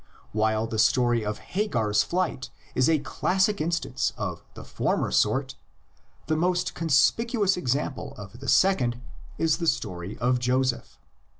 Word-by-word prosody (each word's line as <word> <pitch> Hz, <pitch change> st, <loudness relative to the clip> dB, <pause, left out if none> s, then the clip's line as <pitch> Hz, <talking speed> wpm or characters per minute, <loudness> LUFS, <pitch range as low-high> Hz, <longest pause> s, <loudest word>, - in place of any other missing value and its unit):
While 110 Hz, +1 st, +1 dB
the 110 Hz, -1 st, -3 dB
story 120 Hz, -1 st, +3 dB
of 105 Hz, 0 st, -3 dB
Hagar's 115 Hz, -, 0 dB
flight 175 Hz, -2 st, -2 dB, 0.2 s
is 130 Hz, +2 st, +3 dB
a 160 Hz, -, +4 dB
classic 190 Hz, +6 st, 0 dB
instance 165 Hz, -5 st, -1 dB
of -, -, -4 dB
the -, -, -9 dB
former -, -, -1 dB
sort, 130 Hz, +5 st, +1 dB, 0.7 s
the 155 Hz, -, 0 dB
most 180 Hz, +2 st, 0 dB
conspicuous 195 Hz, -, +2 dB
example 140 Hz, -3 st, -2 dB
of 105 Hz, +3 st, -10 dB
the 135 Hz, -1 st, -4 dB
second 125 Hz, -11 st, +3 dB, 0.4 s
is 160 Hz, -2 st, +2 dB
the 170 Hz, -, -2 dB
story 95 Hz, -, -2 dB
of 125 Hz, +1 st, +1 dB
Joseph. 125 Hz, 0 st, -1 dB
130 Hz, 135 wpm, -26 LUFS, 115-170 Hz, 0.7 s, a